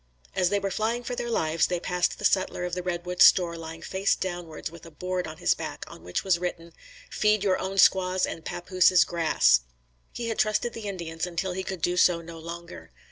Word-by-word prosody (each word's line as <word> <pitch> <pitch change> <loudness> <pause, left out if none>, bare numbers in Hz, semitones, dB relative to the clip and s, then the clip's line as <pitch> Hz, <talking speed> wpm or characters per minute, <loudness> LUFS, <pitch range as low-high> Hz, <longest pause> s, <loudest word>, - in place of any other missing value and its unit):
As 180 - +2
they 205 +1 +1
were 195 0 -3
flying 225 +5 -1
for 245 - -4
their 240 0 -4
lives, 160 -7 +1
they 180 -1 -1
passed 180 0 -1
the - - -5
sutler 185 -2 +1
of 180 - -5
the 180 - -1
Redwood 180 0 -3
store 175 -2 +6
lying 165 0 -8
face 195 +1 +1
downwards 175 -4 -5
with 170 -1 -13
a 165 - -11
board 180 +2 -3
on 155 - -8
his - - +2
back - - -6
on - - -12
which 90 - -3
was 185 -3 +2
written, 170 -2 -5 0.4
"Feed 210 -1 +2
your 190 -2 +2
own 195 +1 -4
squaws 185 -1 +4
and 165 - -7
papooses 180 0 +3
grass." 155 - +3 0.5
He 235 -1 -4
had 225 - -3
trusted 215 +2 +1
the 225 -2 -6
Indians 170 -3 -4
until 180 +2 -3
he 190 +1 -3
would 190 -4 -5
do 180 0 +1
so 180 -1 +4
no 165 0 -10
longer. 170 - -9
180 Hz, 215 wpm, -26 LUFS, 170-190 Hz, 0.5 s, store